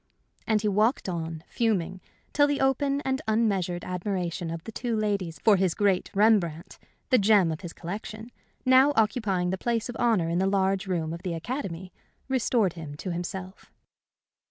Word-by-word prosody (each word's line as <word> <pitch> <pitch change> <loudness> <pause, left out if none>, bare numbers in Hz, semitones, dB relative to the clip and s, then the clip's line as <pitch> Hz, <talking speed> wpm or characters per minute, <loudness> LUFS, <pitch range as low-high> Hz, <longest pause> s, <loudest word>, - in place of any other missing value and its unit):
And 220 -1 +2
he - - +1
walked 215 +5 +2
on, 165 -3 -4
fuming, 190 -5 -1 0.3
till 290 0 +4
the 285 -1 0
open 275 +1 +1
and 265 0 -1
unmeasured 195 -6 0
admiration 180 -2 -3
of 165 0 -5
the 225 - -8
two 235 +1 -2
ladies 200 -6 -1
for 210 -3 +6
his 185 -2 +1
great 200 -3 +1
Rembrandt, 195 -5 +2 0.3
the 255 - +6
gem 200 -4 +4
of 160 - -5
his 175 - -7
collection, 215 +7 -7 0.3
now 260 +3 +6
occupying 210 -5 +1
the 190 - -3
place 235 -1 -1
of 240 - -5
honor 225 -8 +2
in 170 +1 0
the 190 - +2
large 195 0 +1
room 165 -4 -1
of 170 - -7
the 180 -3 -3
Academy, 185 - -5 0.3
restored 235 -7 +1
him 155 -4 -8
to 185 - -4
himself. 180 +2 -6
195 Hz, 170 wpm, -27 LUFS, 175-225 Hz, 0.3 s, for